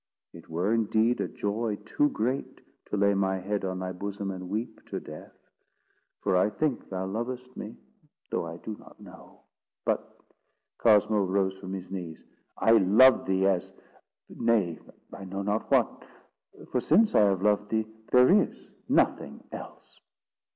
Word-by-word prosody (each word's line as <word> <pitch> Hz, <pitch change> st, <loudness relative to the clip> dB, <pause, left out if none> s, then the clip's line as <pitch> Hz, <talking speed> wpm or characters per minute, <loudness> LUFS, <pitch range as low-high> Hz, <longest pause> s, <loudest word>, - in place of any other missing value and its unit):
It -, -, -14 dB
were 90 Hz, +7 st, 0 dB
indeed 115 Hz, +1 st, +2 dB
a -, -, -1 dB
joy 105 Hz, +1 st, -2 dB
too 145 Hz, +6 st, +2 dB
great, 125 Hz, +4 st, -2 dB, 0.3 s
to 105 Hz, -, -3 dB
lay 100 Hz, 0 st, +3 dB
my 95 Hz, -1 st, +1 dB
head 100 Hz, +2 st, -3 dB
on 95 Hz, -1 st, -2 dB
thy 95 Hz, 0 st, -4 dB
bosom 100 Hz, +1 st, -4 dB
and 90 Hz, -1 st, -7 dB
weep 110 Hz, +2 st, -4 dB
to -, -, -4 dB
death; 75 Hz, 0 st, -11 dB, 0.9 s
for -, -, +2 dB
I 90 Hz, +3 st, +4 dB
think 140 Hz, +4 st, -2 dB
thou 95 Hz, 0 st, -3 dB
lovest 125 Hz, +5 st, -5 dB
me, 105 Hz, -, -8 dB, 0.5 s
though 85 Hz, -, -1 dB
I 85 Hz, 0 st, -7 dB
do 110 Hz, +4 st, -7 dB
not -, -, -17 dB
know;—but——" -, -, -7 dB, 0.6 s
Cosmo 105 Hz, -2 st, +4 dB
rose 95 Hz, 0 st, 0 dB
from 95 Hz, -1 st, -7 dB
his 95 Hz, -1 st, -7 dB
knees. 85 Hz, -4 st, -6 dB, 0.3 s
"I 110 Hz, -, +3 dB
love 115 Hz, +5 st, +6 dB
thee 95 Hz, 0 st, +2 dB
as—nay, 95 Hz, +1 st, -2 dB, 0.3 s
I 100 Hz, -, -8 dB
know 95 Hz, +1 st, -5 dB
not 105 Hz, +2 st, -1 dB
what—for -, -, -3 dB
since 220 Hz, 0 st, +4 dB
I 105 Hz, -, +6 dB
have 95 Hz, -1 st, +1 dB
loved 105 Hz, 0 st, +2 dB
thee, 110 Hz, -1 st, 0 dB, 0.3 s
there 125 Hz, 0 st, +7 dB
is -, -, -4 dB, 0.3 s
nothing -, -, +1 dB
else." -, -, -10 dB
100 Hz, 150 wpm, -28 LUFS, 95-110 Hz, 0.9 s, there